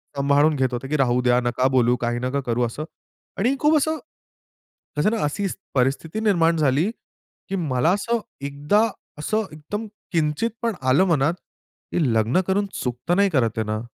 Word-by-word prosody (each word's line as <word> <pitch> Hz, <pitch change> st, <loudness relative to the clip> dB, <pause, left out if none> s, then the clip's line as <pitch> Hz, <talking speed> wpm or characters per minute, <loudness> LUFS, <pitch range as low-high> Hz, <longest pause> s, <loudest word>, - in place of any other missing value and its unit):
सांभाळून 140 Hz, +2 st, +3 dB
घेत 130 Hz, -2 st, +2 dB
होते, 125 Hz, +2 st, -4 dB
की 150 Hz, -, -1 dB
राहू 125 Hz, -2 st, +2 dB
द्या 125 Hz, 0 st, +3 dB
नका 125 Hz, +2 st, +1 dB
बोलू, 125 Hz, -1 st, +3 dB
काही 120 Hz, 0 st, -1 dB
नका 130 Hz, +3 st, -1 dB
करू 120 Hz, +1 st, 0 dB
असं 120 Hz, +6 st, -5 dB, 0.5 s
आणि 240 Hz, +8 st, +2 dB
खूप 300 Hz, +1 st, +4 dB
असं, 315 Hz, +2 st, +1 dB, 1.0 s
कसं 155 Hz, +8 st, +3 dB
ना 230 Hz, -, 0 dB
अशी 150 Hz, +7 st, -1 dB, 0.3 s
परिस्थिती 140 Hz, +9 st, 0 dB
निर्माण 170 Hz, -6 st, +3 dB
झाली 150 Hz, +4 st, +2 dB, 0.6 s
की 195 Hz, -, -1 dB
मला 155 Hz, -3 st, +1 dB
असं 230 Hz, +4 st, 0 dB, 0.3 s
एकदा 145 Hz, +9 st, +1 dB, 0.4 s
असं 215 Hz, +8 st, 0 dB
एकदम 155 Hz, +9 st, -5 dB, 0.3 s
किंचित 160 Hz, +6 st, +1 dB
पण 230 Hz, -2 st, 0 dB
आलं 130 Hz, +7 st, +4 dB
मनात 155 Hz, -2 st, +2 dB, 0.6 s
की 175 Hz, -, +1 dB
लग्न 115 Hz, +10 st, +2 dB
करून 200 Hz, +2 st, +1 dB, 0.2 s
चुकतं 125 Hz, +7 st, -1 dB
नाही 200 Hz, +1 st, +4 dB
करत 120 Hz, -, +1 dB
ये 110 Hz, -, +1 dB
ना. 110 Hz, 0 st, -2 dB
150 Hz, 170 wpm, -23 LUFS, 125-195 Hz, 1.0 s, खूप